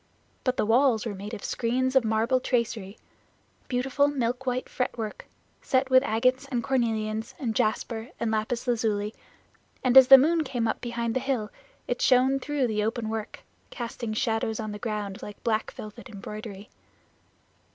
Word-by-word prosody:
But 255 -1 0
the - - +1
walls 235 0 +3
were 220 - -3
made 205 +3 -6
of 205 - -10
screens 255 +3 0
of 265 - +6
marble 225 +3 +2
tracery 230 -5 -2 0.7
beautiful 270 +3 +1
milk 255 -2 -2
white 255 0 -1
fretwork, 230 -4 -4 0.3
set 260 0 +1
with 260 0 +7
agates 255 +3 +1
and 245 -4 -2
cornelians 220 -4 -1
and 235 -5 -2
jasper 220 +2 -1
and 230 - -1
lapis 220 +3 -1
lazuli, 220 -3 0 0.7
and 255 -1 +2
as 265 -1 +10
the 270 0 +11
moon 320 +4 +3
came 245 -5 -1
up 220 - -2
behind 235 -1 -2
the - - +2
hill 250 -5 -2 0.4
it 245 - -2
shone 260 +1 +4
through 285 -1 -1
the 215 -3 0
open 225 0 -2
work, 220 -1 -5 0.3
casting 235 -2 -5
shadows 220 -1 0
on 215 -1 -4
the 210 - -7
ground 210 -4 -4
like 205 - -9
black 220 -2 0
velvet 215 +2 -10
embroidery. 210 0 -8
235 Hz, 160 wpm, -27 LUFS, 215-255 Hz, 0.7 s, the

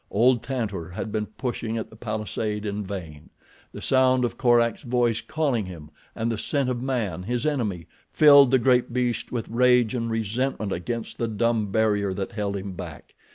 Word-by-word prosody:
Old 120 +3 +3
Tantor 110 -9 -3
had 95 +4 -5
been 105 -1 -2
pushing 115 0 -4
at 110 - -5
the - - -13
palisade 110 -1 -3
in 105 0 -3
vain. 90 -7 -7 0.4
The - - -9
sound 130 -1 +3
of 120 - -3
Korak's 120 -3 +3
voice 120 -3 +1
calling 135 -10 -1
him, 80 -4 -10 0.2
and 115 +1 -1
the 110 - -3
scent 140 0 0
of 120 -1 -2
man, 115 -10 -2
his 120 +7 -2
enemy, 110 - -1 0.3
filled 145 -3 +7
the 130 - +5
great 125 0 +2
beast 125 -1 -1
with 120 -2 -3
rage 125 -1 +3
and 115 -2 -2
resentment 115 0 -2
against 115 +6 -4
the 115 - 0
dumb 110 0 0
barrier 105 -3 +1
that 95 0 -4
held 100 -1 -2
him 100 0 -5
back. 85 -5 -9
115 Hz, 180 wpm, -25 LUFS, 105-125 Hz, 0.4 s, filled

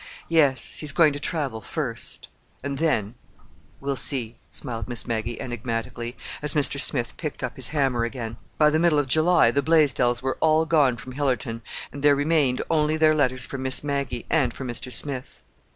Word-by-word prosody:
"Yes, 145 -5 +2
he's 150 -2 -1
going 155 -3 +4
to 145 - -5
travel, 145 -8 -3
first. 120 +1 -5 0.4
And 140 0 -4
then—we'll 135 0 -4
see," 120 -2 +1
smiled 115 -4 -5
Miss 120 -2 -2
Maggie 115 0 -3
enigmatically, 120 0 -5 0.2
as 150 0 +6
Mr. 140 -1 +2
Smith 120 -4 +4
picked 150 -4 -5
up 125 - -4
his 130 - +2
hammer 135 -6 0
again. 115 -1 -5 0.2
By 150 -1 +4
the 155 - +2
middle 170 -2 +3
of 145 - +2
July 155 -1 +4
the 140 - +1
Blaisdells 135 -6 +2
were 130 - -2
all 160 0 +3
gone 145 -6 +3
from 130 - -9
Hillerton 125 -4 -2 0.3
and 140 - -8
there 145 0 +5
remained 145 -3 +1
only 155 -1 +1
their 155 0 +4
letters 130 -4 +1
for 135 - -6
Miss 130 0 +1
Maggie—and 140 -1 -1
for 135 - -6
Mr. 125 +1 -4
Smith. 135 -1 -3
135 Hz, 170 wpm, -24 LUFS, 120-150 Hz, 0.4 s, as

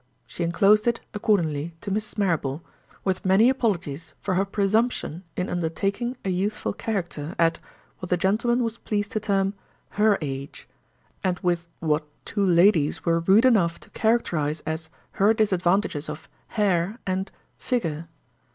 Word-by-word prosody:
She 170 - -5
inclosed 200 +6 +4
it, 235 -1 +2
accordingly, 170 -7 0
to 200 - -5
Mrs. 215 +2 -3
Marrable, 165 -6 0 0.4
with 190 -1 -1
many 195 +6 +5
apologies 175 - -2
for 190 - -2
her 190 +2 +2
presumption 200 -3 0
in 180 - -1
undertaking 195 +8 -2
a 190 - +1
youthful 200 +4 -1
character, 175 -7 -4
at—what 170 +2 -3
a 180 - +4
gentleman 230 +7 +2
was 230 0 -3
pleased 205 -1 -2
to 215 - 0
term—her 200 +1 0
Age; 140 -2 -6 0.6
and 185 -1 +1
with 175 -2 0
what 150 -1 0 0.2
two 205 - -1
ladies 175 -4 +4
were 165 -1 +3
rude 195 +8 +5
enough 190 -10 +3
to - - -14
characterize 165 -10 0
as 160 0 -4 0.2
her 210 +3 +3
disadvantages 185 -6 +1
of—Hair, 185 +5 -2
and—Figure. 185 - -3
190 Hz, 135 wpm, -25 LUFS, 165-210 Hz, 0.6 s, many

